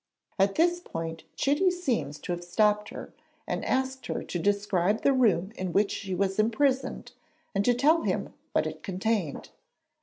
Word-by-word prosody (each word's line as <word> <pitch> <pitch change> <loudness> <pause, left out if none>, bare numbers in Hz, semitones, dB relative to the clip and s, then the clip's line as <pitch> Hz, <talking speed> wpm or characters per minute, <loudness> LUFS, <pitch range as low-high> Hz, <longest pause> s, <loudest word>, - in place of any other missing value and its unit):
At 195 +1 +3
this 345 +1 +3
point 165 - -6
Chitty 290 +7 +3
seems 260 - -1
to - - -4
have 175 0 -3
stopped 210 +3 +2
her, - - -9 0.3
and - - -3
asked 265 0 -1
her - - -3
to 175 - -4
describe 205 +1 +1
the 275 - +5
room 205 -7 +2
in 185 -2 -4
which 200 0 +3
she 190 -3 -3
was 195 +2 0
imprisoned 260 +5 +1 0.4
and 200 - +1
to 245 - +4
tell 305 +7 +4
him - - -2 0.2
what - - +2
it - - -5
contained. 195 -4 -2
210 Hz, 170 wpm, -28 LUFS, 185-265 Hz, 0.4 s, the